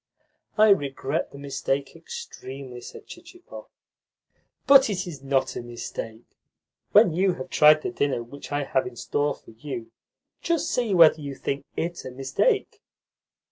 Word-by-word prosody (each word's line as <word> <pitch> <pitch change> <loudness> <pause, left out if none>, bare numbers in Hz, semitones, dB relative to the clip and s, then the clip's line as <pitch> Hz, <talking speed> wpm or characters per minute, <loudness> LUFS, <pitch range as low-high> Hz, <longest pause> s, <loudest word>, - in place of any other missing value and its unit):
"I 215 0 +6
regret 145 -4 0
the - - -12
mistake 140 0 -3
extremely," 135 - -9
said - - -11
Chichikov. 350 +1 -12 1.0
"But 270 -3 +7
it 185 -3 -2
is 155 -6 -8
not 135 -1 0
a - - -4
mistake. 120 -1 -7 0.7
When 205 -5 +6
you 185 +2 +2
have 130 - -8
tried 150 0 +6
the - - -2
dinner 140 -8 -1
which 140 +4 -11
I 145 0 0
have 130 -2 0
in 125 - -9
store 145 +4 -1
for - - -17
you, 115 0 -7 0.5
just 335 -1 0
see 235 -6 0
whether 160 -2 +6
you 140 -1 -6
think 140 +1 -4
IT 170 +1 -3
a - - -6
mistake. 270 - 0
145 Hz, 150 wpm, -25 LUFS, 135-195 Hz, 1.0 s, But